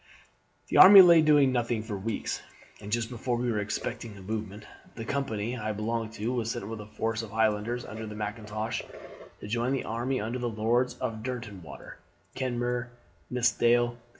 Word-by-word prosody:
"The - - +1
army 195 0 +11
lay 170 -2 +7
doing 145 -3 +5
nothing 120 -3 -1
for 110 -2 -5
weeks, 105 +3 -3 0.4
and 100 - -8
just 115 0 0
before 120 0 -2
we 120 0 -1
were 105 - 0
expecting 105 +1 -4
a - - -11
movement, 105 0 -5 0.3
the 115 - -6
company 120 -4 -2
I 110 -2 -3
belonged 110 +1 -3
to 115 +3 -3
was 115 -3 -2
sent 100 - -4
with 110 -1 -6
a 105 - -10
force 110 +1 -2
of 115 - -8
Highlanders 110 +2 0
under 110 0 -7
Mackintosh 105 +1 -4 0.6
to - - -7
join 120 +4 0
the 135 - -1
army 120 +4 -2
under 115 +4 -3
the 120 -1 -2
Lords 115 +3 0
Derwentwater, 110 - -6 0.4
Kenmure, 125 -1 -2 0.4
and 125 - -4
Nithsdale. 120 0 +2
115 Hz, 170 wpm, -28 LUFS, 110-120 Hz, 0.6 s, army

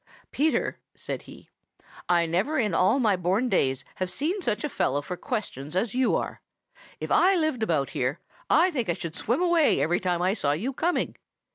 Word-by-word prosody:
"Peter," 310 +3 0 0.2
said - - -5
he, - - -13 0.6
"I 170 -1 +4
never 190 - 0
in 215 - +1
all 190 +10 +3
my 215 -6 +3
born 190 +8 0
days 135 - +1
have 185 -1 -2
seen 335 - -2
such 225 - -1
a 300 - -1
fellow 145 - 0
for 180 - -5
questions 175 - -5
as 200 +3 0
you 255 0 +2
are. - - -3 0.6
If - - -5
I 380 +2 +5
lived 310 -8 0
about 155 - 0
here, 130 +5 -1 0.3
I 350 +4 +5
think 245 - -2
I - - +3
should 165 0 -6
swim 245 - 0
away 340 -4 +3
every 175 +3 +1
time 180 -2 0
I 185 +2 +2
saw 145 -9 0
you 225 - -2
coming. 340 +6 -1
210 Hz, 190 wpm, -26 LUFS, 170-280 Hz, 0.6 s, I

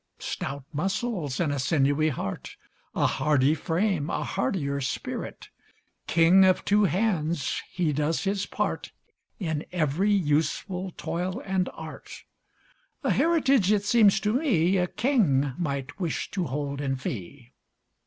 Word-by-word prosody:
Stout 140 0 -5
muscles 185 - -2
and 155 -5 +1
a 140 - -2
sinewy 145 +2 +2
heart, 110 -9 -5 0.4
A - - +2
hardy 145 0 +2
frame, 165 0 0
a - - -1
hardier 140 -8 -1
spirit; 135 +2 -5 0.6
King 170 +3 +6
of 185 -1 +3
two 205 0 +4
hands, 175 -6 0
he 170 -5 0
does 150 +3 0
his 195 0 -1
part - - -3 0.5
In 160 -5 -2
every 175 +3 +1
useful 180 +2 0
toil 180 +5 -3
and 190 -1 0
art; - - -9 0.8
A - - +2
heritage, 275 - +3
it 205 -1 +2
seems 205 -3 +5
to 210 +1 +1
me, 195 - +2
A 180 -1 +1
king 175 - +1
might 140 -2 -3
wish 170 -4 -2
to 185 -3 -1
hold 140 +1 -3
in 135 -2 -1
fee. 125 +1 -7
170 Hz, 135 wpm, -26 LUFS, 145-195 Hz, 0.8 s, King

